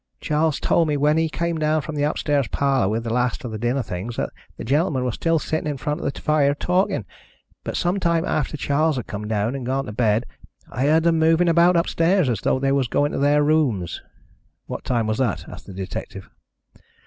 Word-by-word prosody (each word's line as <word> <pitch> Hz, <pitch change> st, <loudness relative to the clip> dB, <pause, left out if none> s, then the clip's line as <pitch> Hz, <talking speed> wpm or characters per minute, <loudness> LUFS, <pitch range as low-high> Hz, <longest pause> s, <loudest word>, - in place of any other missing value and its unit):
Charles 155 Hz, -1 st, 0 dB
told 165 Hz, -, +2 dB
me 150 Hz, -1 st, 0 dB
when 150 Hz, +2 st, +3 dB
he 160 Hz, 0 st, +1 dB
came 170 Hz, +1 st, -2 dB
down 155 Hz, 0 st, +1 dB
from 160 Hz, -, -6 dB
the 145 Hz, -, -2 dB
upstairs 145 Hz, -2 st, 0 dB
parlour 135 Hz, -7 st, +1 dB
with 115 Hz, +2 st, -1 dB
the 115 Hz, -1 st, -3 dB
last 125 Hz, +2 st, 0 dB
of 120 Hz, -, -5 dB
the 110 Hz, -, -5 dB
dinner 120 Hz, +3 st, 0 dB
things 105 Hz, +5 st, -5 dB
that -, -, -2 dB, 0.3 s
the -, -, -6 dB
gentlemen 140 Hz, +1 st, +1 dB
were 125 Hz, -, 0 dB
still 165 Hz, +8 st, +1 dB
sitting 155 Hz, 0 st, -2 dB
in 145 Hz, -, -3 dB
front 150 Hz, +3 st, -3 dB
of -, -, -1 dB
the -, -, -10 dB
fire 145 Hz, -2 st, +2 dB
talking, 180 Hz, +5 st, 0 dB, 0.6 s
but -, -, -3 dB
some 180 Hz, +3 st, 0 dB
time 170 Hz, -1 st, +1 dB
after 150 Hz, -2 st, -1 dB
Charles 150 Hz, +2 st, +1 dB
had 125 Hz, -, -4 dB
come 105 Hz, +1 st, -6 dB
down 110 Hz, +2 st, 0 dB
and 135 Hz, -2 st, -5 dB
gone 135 Hz, +2 st, -1 dB
to 105 Hz, -, -6 dB
bed 110 Hz, +1 st, +1 dB, 0.5 s
I 130 Hz, +4 st, 0 dB
heard 160 Hz, +2 st, +4 dB
them 165 Hz, -1 st, +3 dB
moving 165 Hz, +2 st, +3 dB
about 170 Hz, +2 st, +5 dB
upstairs, 170 Hz, -1 st, +2 dB
as 115 Hz, -4 st, -1 dB
though -, -, +1 dB
they 135 Hz, +1 st, 0 dB
were 135 Hz, -1 st, +2 dB
going 145 Hz, +3 st, +1 dB
to -, -, -3 dB
their 145 Hz, +1 st, +3 dB
rooms." 140 Hz, -, +1 dB, 0.6 s
"What -, -, -6 dB
time 120 Hz, -3 st, 0 dB
was 110 Hz, +2 st, -1 dB
that?" 125 Hz, -7 st, -1 dB
asked -, -, -11 dB
the -, -, -8 dB
detective. 95 Hz, 0 st, -7 dB
145 Hz, 220 wpm, -22 LUFS, 120-160 Hz, 0.6 s, about